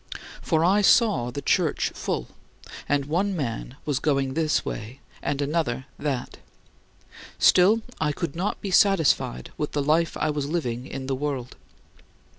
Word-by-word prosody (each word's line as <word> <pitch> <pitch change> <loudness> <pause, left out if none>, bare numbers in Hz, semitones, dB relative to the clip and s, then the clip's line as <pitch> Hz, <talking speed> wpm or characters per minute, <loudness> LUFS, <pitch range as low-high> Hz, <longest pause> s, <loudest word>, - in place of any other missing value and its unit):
2. - - -7 0.2
For 160 -1 +2
I 200 +4 +4
saw 200 - +4
the 140 +3 -6
Church 165 -1 +1
full; - - -3 0.6
and 145 -1 +1
one 185 +7 0
man 125 -4 -4
was 145 -3 0
going 135 -3 0
this 155 0 +1
way 115 +5 -6 0.2
and 145 0 -1
another 140 -4 -1
that. 140 -4 -3 1.0
Still, 205 +5 +5 0.2
I 150 -1 +1
could 155 0 -4
not 185 +5 -2
be 195 - -4
satisfied 165 - +3
with 150 - -2
the 145 - 0
life 160 +3 +2
I 155 0 0
was 145 -1 -2
living 130 -6 -2
in 135 -1 -6
the 135 - -1
world. 135 -2 -3
150 Hz, 155 wpm, -25 LUFS, 135-170 Hz, 1.0 s, Still